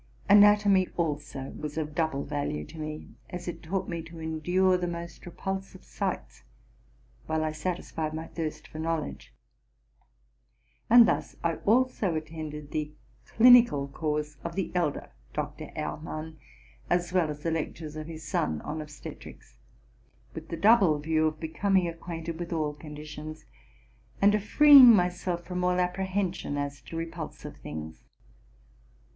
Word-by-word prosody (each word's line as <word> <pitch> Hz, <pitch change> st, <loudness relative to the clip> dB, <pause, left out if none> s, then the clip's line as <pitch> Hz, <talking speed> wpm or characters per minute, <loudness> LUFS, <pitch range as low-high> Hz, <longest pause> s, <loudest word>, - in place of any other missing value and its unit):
Anatomy, 205 Hz, -2 st, +6 dB
also, 145 Hz, -4 st, -3 dB
was 150 Hz, 0 st, -6 dB
of 155 Hz, -1 st, -3 dB
double 160 Hz, -3 st, 0 dB
value 140 Hz, -, -3 dB
to 160 Hz, -, -12 dB
me, 155 Hz, 0 st, -6 dB, 0.2 s
as 175 Hz, 0 st, -7 dB
it 175 Hz, -, -5 dB
taught 185 Hz, +4 st, -3 dB
me 170 Hz, -1 st, -3 dB
to 165 Hz, +1 st, -12 dB
endure 175 Hz, +4 st, +1 dB
the 180 Hz, -1 st, -1 dB
most 170 Hz, 0 st, -6 dB
repul 190 Hz, +2 st, -3 dB
sive 195 Hz, -, -16 dB
sights, 60 Hz, 0 st, -4 dB, 0.9 s
while 160 Hz, 0 st, 0 dB
I 155 Hz, -, -1 dB
satisfied 160 Hz, -1 st, -3 dB
my 160 Hz, +1 st, -5 dB
thirst 160 Hz, -2 st, -5 dB
for 155 Hz, -, -9 dB
knowledge. 160 Hz, -2 st, -3 dB, 1.6 s
And 235 Hz, 0 st, +9 dB
thus -, -, -1 dB
I 165 Hz, -1 st, 0 dB
also 225 Hz, -5 st, +2 dB
attended 155 Hz, -2 st, -6 dB
the 150 Hz, -1 st, -2 dB, 0.4 s
clinical 235 Hz, -, +6 dB
course 150 Hz, 0 st, -3 dB
of 170 Hz, -, -5 dB
the 190 Hz, -2 st, -2 dB
elder 170 Hz, -5 st, -1 dB, 0.2 s
Dr. -, -, -5 dB
Ehr -, -, -3 dB
mann, 155 Hz, +1 st, -7 dB, 0.5 s
as 175 Hz, 0 st, 0 dB
well 175 Hz, -4 st, +2 dB
as 150 Hz, 0 st, -6 dB
the 165 Hz, -, 0 dB
lectures 155 Hz, -1 st, -4 dB
of 155 Hz, 0 st, -6 dB
his 160 Hz, -2 st, -8 dB
son 80 Hz, -, 0 dB
on 155 Hz, +1 st, -4 dB
obstetrics, 150 Hz, -1 st, -11 dB, 0.7 s
with 160 Hz, 0 st, -8 dB
the 165 Hz, -, -4 dB
double 200 Hz, -5 st, +5 dB
view 155 Hz, +1 st, +1 dB
of 155 Hz, 0 st, -4 dB
becoming 185 Hz, +3 st, +1 dB
acquainted 165 Hz, 0 st, -6 dB
with 175 Hz, 0 st, -5 dB
all 155 Hz, -3 st, -1 dB
conditions, 150 Hz, +1 st, -9 dB, 0.7 s
and 200 Hz, +1 st, +5 dB
of 210 Hz, -1 st, +1 dB
freeing 275 Hz, -1 st, +9 dB
myself 180 Hz, -1 st, 0 dB
from 180 Hz, 0 st, -3 dB
all 180 Hz, 0 st, +2 dB
apprehension 185 Hz, -3 st, -1 dB
as 140 Hz, -1 st, -4 dB
to 125 Hz, +7 st, -8 dB
repulsive 165 Hz, 0 st, -6 dB
things. 80 Hz, +1 st, -8 dB
160 Hz, 145 wpm, -28 LUFS, 150-180 Hz, 1.6 s, And